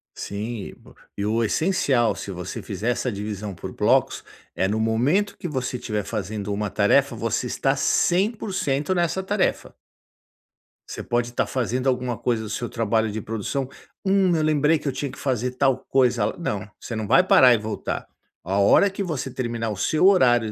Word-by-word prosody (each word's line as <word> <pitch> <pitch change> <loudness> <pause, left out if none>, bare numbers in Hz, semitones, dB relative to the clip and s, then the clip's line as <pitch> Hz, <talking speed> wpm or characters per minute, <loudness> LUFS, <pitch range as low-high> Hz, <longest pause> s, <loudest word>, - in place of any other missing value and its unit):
Sim, 105 +1 -5
o - - -15 0.3
e 100 - -2
o 115 +2 +1
essencial, 135 - +1
se 100 - -6
você 90 0 -6
fizer 105 +4 -3
essa 125 0 -2
divisão 105 0 -5
por - - -7
blocos, - - +2 0.3
é 95 +2 +1
no 105 +3 -1
momento 130 - +1
que 175 - -5
você 130 -4 -3
estiver 105 -4 -3
fazendo 105 0 -4
uma 105 0 -2
tarefa 100 0 +3
você - - -1
estar - - 0
100% 185 - +1
nessa 175 +1 0
tarefa. 200 0 -1 1.2
Você - - -6
pode 120 0 -1
estar 120 - -1
fazendo 130 +1 -2
alguma 125 -2 0
coisa 120 -3 -1
do 110 - -6
seu 120 +3 -3
trabalho 110 -1 0
de 110 0 -4
produção, 115 +6 -3 0.3
"hum, 190 -3 +3
eu 160 - +1
lembrei 155 0 +3
que 150 - -7
eu - - +1
tinha 135 +1 -4
que - - -12
fazer 125 -2 -1
tal 130 0 +2
coisa", 125 -5 +2
não, 105 - -3
você 115 - -5
não 110 - -3
vai 130 +6 +5
parar 130 -1 +6
e 120 - +3
voltar. 110 0 -4 0.4
A 95 +3 -1
hora 100 - +5
que 195 +1 -4
você 155 -7 -3
terminar 120 -3 -3
o 105 - -4
seu 155 - +3
horário 120 - +4
120 Hz, 180 wpm, -23 LUFS, 105-145 Hz, 1.2 s, parar